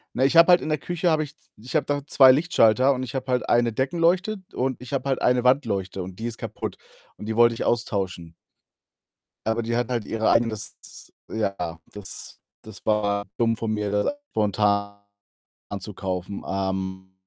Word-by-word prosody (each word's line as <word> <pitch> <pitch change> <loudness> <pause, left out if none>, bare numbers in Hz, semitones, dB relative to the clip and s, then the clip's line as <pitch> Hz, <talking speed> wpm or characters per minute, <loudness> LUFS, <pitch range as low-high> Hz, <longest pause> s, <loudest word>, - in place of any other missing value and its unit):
Na, 130 - +2
ich 155 +5 +2
habe 170 +2 +8
halt 175 - +7
in - - -4
der 155 - +1
Küche 175 +3 -1
habe 155 -1 +2
ich 150 0 -8
z - - -31
ich 125 +7 -4
habe 150 - +2
da 145 0 0
2 130 -3 +7
Lichtschalter 135 -4 +4
und 130 - -4
ich 130 +2 -6
habe 130 0 -3
halt 125 0 0
eine 120 -1 +3
Deckenleuchte 175 - +1 0.2
und 130 0 -1
ich 125 +2 -10
habe 140 0 -1
halt 135 - 0
eine 125 0 +2
Wandleuchte 100 -8 +1
und 90 0 -9
die 115 - -4
ist 115 -1 -5
kaputt - - -5 0.4
und 105 - -9
die 110 0 -3
wollte 120 0 +5
ich - - -4
austauschen. 95 -8 -2 1.1
Aber 110 +1 0
die 115 +1 -1
hat 120 -1 0
halt 120 -4 -1
ihre 110 0 0
eigenes 110 -3 +1
s - - -13 0.2
Ja, 100 -6 -3
das 105 -2 -9 0.2
das 110 -2 -13
war 100 -1 +1
dumm 115 -1 +2
von 115 -1 -3
mir, 105 -1 -2
das 105 - +1 0.2
spontan 100 -1 0 0.7
anzukaufen. 95 -2 -5
Ähm, 95 -1 -3
115 Hz, 190 wpm, -24 LUFS, 100-130 Hz, 1.1 s, habe